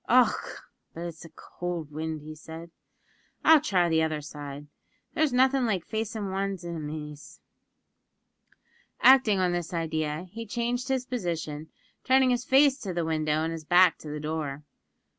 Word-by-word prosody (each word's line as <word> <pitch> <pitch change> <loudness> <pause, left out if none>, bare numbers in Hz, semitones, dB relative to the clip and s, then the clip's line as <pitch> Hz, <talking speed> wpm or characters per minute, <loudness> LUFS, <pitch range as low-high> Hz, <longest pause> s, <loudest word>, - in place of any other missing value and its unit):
"Och! 250 +1 +2 0.3
but 165 - -6
it's 170 -1 -7
a - - -11
cowld 170 -1 -6
wind," 155 0 -5
said 160 +2 -10
he. - - -30
"I'll 320 -2 +8
try 185 - +2
the 160 -1 +2
other 155 -1 0
side. 145 -1 -8 0.5
There's 315 -3 +2
nothin' 260 0 +3
like 190 -6 -1
facin' 220 -2 -3
wan's 195 -1 -2
inimies." 150 -3 -7 1.6
Acting 260 -6 +6
on 180 -1 +2
this 175 0 -3
idea, 155 0 -2
he 230 +2 -7
changed 240 +3 -2
his 260 -2 0
position, 165 -10 -4 0.3
turning 260 0 +4
his 245 0 0
face 275 +1 +5
to 190 -6 -5
the 170 -2 0
window 155 -1 0
and 165 - -1
his 165 -1 -6
back 175 +1 +5
to 155 - -9
the 150 0 -4
door. 150 -2 -4
170 Hz, 155 wpm, -27 LUFS, 155-230 Hz, 1.6 s, I'll